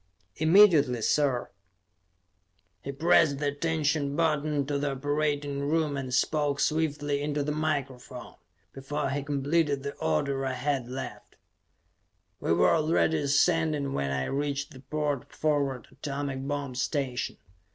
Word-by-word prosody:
"Immediately, 155 - +5
sir!" 135 -3 +1 1.3
He 140 - -5
pressed 155 0 +3
the 145 0 0
attention 150 -1 -1
button 150 -3 +1
to 145 0 -1
the 145 -1 -1
operating 145 0 -1
room 150 +1 0
and 135 -2 -4
spoke 145 +2 +1
swiftly 145 -2 0
into 145 0 -1
the 150 - -2
microphone; 140 -4 -3 0.4
before 145 +2 -3
he 145 +1 -1
completed 145 0 0
the 140 - -4
order 135 - 0
I 130 -1 -1
had 130 -1 -1
left. 130 0 -7 1.0
We - - -1
were 85 +1 +4
already 160 0 +2
ascending 145 0 +2
when 70 0 -1
I 70 -1 -1
reached 145 +1 -2
the 130 - -12
port 145 -1 -3
forward 140 -5 -1
atomic 140 -2 -4
bomb 145 -2 -3
station. 125 0 -2
145 Hz, 130 wpm, -28 LUFS, 135-150 Hz, 1.3 s, Immediately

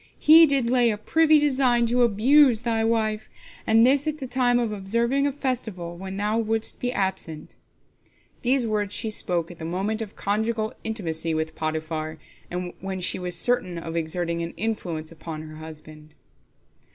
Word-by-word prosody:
He 320 +2 +8
did 275 -4 +2
lay 245 -1 +3
a 210 - -1
privy 315 +8 +3
design 260 -5 +2
to 245 +2 +1
abuse 240 +2 +4
thy 225 -2 0
wife, 220 -1 -1 0.4
and 225 +1 +5
this 280 +3 +3
at 310 0 -1
the 275 - -6
time 245 -1 +1
of 235 -3 -1
observing 235 +7 0
a - - 0
festival, 225 -11 -4
when 190 +2 -7
thou 210 +2 0
wouldst 225 0 -2
be 245 - -1
absent." 190 -7 -3 0.9
These 255 0 +2
words 210 -2 -1
she 220 -3 +1
spoke 175 -4 0
at 175 - -13
the - - -7
moment 195 +7 -2
of 215 -3 -7
conjugal 220 +2 -1
intimacy 165 -7 -2
with 160 0 -2
Potiphar, 155 0 -4 0.6
when 190 0 -5
she 180 - +2
was 180 -1 -4
certain 185 -8 +1
of 165 0 -6
exerting 170 +1 -2
an 165 0 -6
influence 175 -7 -3
upon 160 -1 -8
her 155 0 -10
husband. 155 -1 -11
215 Hz, 165 wpm, -24 LUFS, 170-245 Hz, 0.9 s, He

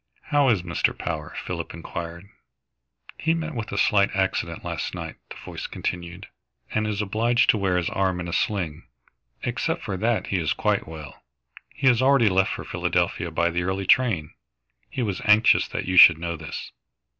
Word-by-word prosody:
"How 145 -2 +4
is 100 -7 +2
Mr. 85 -1 0
Power?" - - -5
Philip 85 -3 -5
enquired. 85 +2 -7 0.9
"He 165 +1 +1
met 160 -1 -4
with 115 -3 -5
a 100 - -3
slight 100 -1 +3
accident 95 -1 -1
last - - -4
night," - - -6
the - - -9
voice - - -6
continued, 90 +2 -5 0.5
"and 110 0 0
is 105 0 -1
obliged 115 +4 +3
to 110 - -2
wear 95 -2 +1
his 90 - 0
arm 95 -2 0
in 85 - -4
a 85 - -5
sling. 85 -8 -2 0.6
Except - - -2
for 95 - -3
that 115 +3 0
he 95 - -1
is 80 -3 0
quite - - 0
well. 80 -4 -10 0.5
He 140 - -4
has 125 -2 +5
already 130 -4 +5
left 95 0 +2
for - - -5
Philadelphia 85 - -1
by 85 +2 +1
the 85 +1 -1
early 95 +2 -2
train. 95 -10 +2 0.6
He 130 - -3
was 100 -5 -2
anxious 105 +2 +5
that - - -4
you 95 0 -1
should 85 -2 +10
know 85 0 -3
this." 80 -2 -7
95 Hz, 180 wpm, -24 LUFS, 85-110 Hz, 0.9 s, should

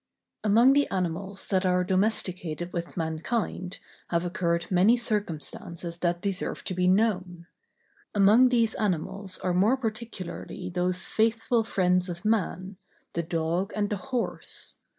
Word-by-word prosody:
Among 230 +5 +6
the 285 0 +3
animals 190 +2 -3
that 190 -1 +2
are 180 -1 +2
domesticated 180 -3 -1
with 170 0 -4
mankind 180 +3 -2 0.3
have 170 0 0
occurred 170 -2 0
many 195 +7 +5
circumstances 180 -5 -3
that 175 0 0
deserve 195 -2 -2
to - - -3
be 180 0 +1
known. 185 -3 +1 0.7
Among 210 +6 +6
these 230 -3 +3
animals 190 0 -2
are 180 - -1
more 205 +9 +4
particularly 215 -6 -5
those 180 +1 -1
faithful 225 +1 +1
friends 180 -3 +1
of 175 +4 -6
man, 195 -3 0 0.4
the 170 - 0
dog, 170 +3 -1
and 205 -1 0
the 205 - 0
horse. 250 -3 -3
185 Hz, 130 wpm, -27 LUFS, 175-215 Hz, 0.7 s, Among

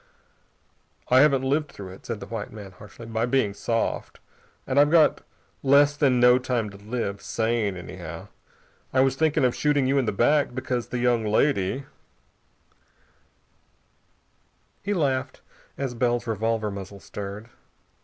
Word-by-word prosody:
"I 130 - +6
haven't 135 -2 +4
lived 145 +3 0
through 95 -2 -9
it," 95 - -13
said 115 -3 -4
the - - -7
white 110 -2 -6
man 105 -3 -10
harshly, 105 +5 -13
"by 115 +1 -1
being 120 -5 +1
soft. 115 +3 -2 0.5
And 135 +1 +1
I've 145 0 +5
got 160 -2 +4 0.4
less 140 +1 +5
than 135 -4 +3
no 125 +1 +6
time 120 -4 -2
to 100 - -12
live 100 -1 -4
sane, 110 -1 -1
anyhow. 85 -2 -8 0.6
I 130 - +3
was 135 -1 +2
thinking 155 -2 +2
of 125 - +2
shooting 145 -2 +1
you 135 +2 +2
in 130 - 0
the - - 0
back, 125 +5 +2
because 125 -2 -2
the 125 - -4
young 120 -2 +2
lady 110 +2 +1 2.2
" - - -42
He 205 +1 -1
laughed 135 -6 -1 0.4
as 135 -3 -3
Bell's 120 0 0
revolver 110 -1 -1
muzzle 100 0 -8
stirred. 100 +5 -8
120 Hz, 150 wpm, -25 LUFS, 105-135 Hz, 2.2 s, I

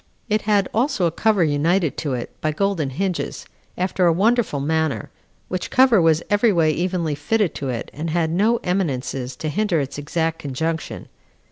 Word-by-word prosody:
It 215 0 +2
had 200 -2 +3
also 230 -5 +1
a 170 - +2
cover 210 +1 +2
united 160 +2 +1
to 145 -4 -2
it, 120 - -5
by 155 0 0
golden 185 -4 0
hinges, 180 +6 -3 0.3
after 180 0 +1
a - - +5
wonderful 210 - +2
manner; 160 +1 -1 0.4
which 185 -1 -3
cover 255 -6 +5
was 165 -1 +3
every 205 +2 +3
way 165 -4 +3
evenly 175 -1 -1
fitted 180 +6 0
to 135 - -2
it, 120 -2 -4
and 160 +3 -4
had 160 0 0
no 215 +7 +3
eminences 135 -8 -2
to 155 - -5
hinder 190 +1 +1
its 140 0 -4
exact 160 +2 -1
conjunction. 160 +4 -3
165 Hz, 170 wpm, -22 LUFS, 150-195 Hz, 0.4 s, a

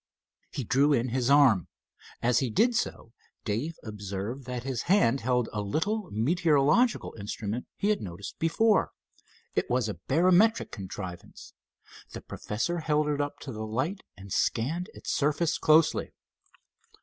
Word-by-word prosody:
He 135 - -4
drew 140 +6 +3
in 125 -1 +1
his 125 +1 0
arm. 135 - +5 0.6
As 120 0 +3
he 130 - -1
did 235 - +2
so 115 - -3 0.3
Dave 125 +10 -2
observed 105 +4 -5
that 125 -1 -5
his 130 -3 -2
hand 140 - +4
held 125 0 +1
a 105 - -2
little 185 - -1
meteorological 150 - +2
instrument 105 +3 -4
he 205 - 0
had 210 - +1
noticed 95 +1 -8
before. 205 +6 +2 0.6
It - - -1
was 125 -2 +1
a 105 - -5
barometric 185 - +3
contrivance. 95 -2 -8 0.6
The - - -7
professor 170 +12 -3
held 150 -1 +1
it 145 -1 0
up 145 0 -3
to 135 - -6
the 110 -2 -5
light 130 - -2 0.2
and 95 -1 -8
scanned 165 - 0
its - - -5
surface 150 +3 +1
closely. 155 +1 +3
135 Hz, 145 wpm, -28 LUFS, 110-165 Hz, 0.6 s, arm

